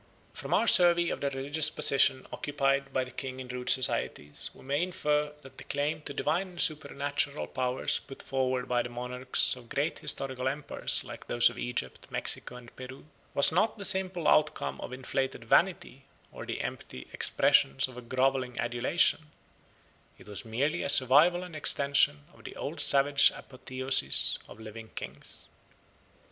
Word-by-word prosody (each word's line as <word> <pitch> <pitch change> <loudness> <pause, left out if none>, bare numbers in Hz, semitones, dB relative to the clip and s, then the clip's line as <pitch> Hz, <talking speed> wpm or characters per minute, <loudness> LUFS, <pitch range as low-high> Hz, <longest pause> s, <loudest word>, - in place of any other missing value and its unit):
From - - -6
our - - +3
survey 175 -4 +5
of - - -4
the 140 - 0
religious 145 +3 +2
position 135 -3 +3
occupied 140 -1 -1
by 130 - 0
the 125 - -10
king 130 +1 -6
in 130 - -7
rude 125 0 -4
societies 75 - 0
we - - -17
may 140 +3 -1
infer 150 -5 -1
that 135 0 -14
the - - -9
claim 145 +2 -2
to 145 - -6
divine 170 +7 -1
and 180 -2 -13
supernatural 145 -1 -1
powers 125 0 -1
put 135 - -11
forward 130 -1 -1
by 120 -1 +1
the 120 - -6
monarchs 125 +2 0
of 120 -2 -14
great 145 +4 -2
historical 130 -1 -2
empires 145 +2 -1
like - - -11
those 120 0 +4
of - - -10
Egypt, 120 - -5
Mexico, - - -2
and 120 -1 -13
Peru, 130 +2 -10 0.3
was 140 - +6
not 215 +7 +1
the 200 - -4
simple 185 -4 -1
outcome 155 0 +1
of - - -7
inflated 130 -1 -3
vanity 165 -1 +1 0.3
or - - -9
the - - -4
empty 65 - -7
expression 70 - +3
of 130 - -13
a 125 - -8
grovelling 130 +1 -1
adulation; 135 +6 +1 0.9
it - - -17
was 105 -1 -6
merely 135 +9 -1
a - - -2
survival 145 +7 +4
and 180 -3 -10
extension 140 - +2
of - - -19
the - - -9
old - - -6
savage 140 0 +5
apotheosis 130 - +1
of 105 - -14
living 110 0 -10
kings. - - -8
135 Hz, 165 wpm, -29 LUFS, 125-150 Hz, 0.9 s, was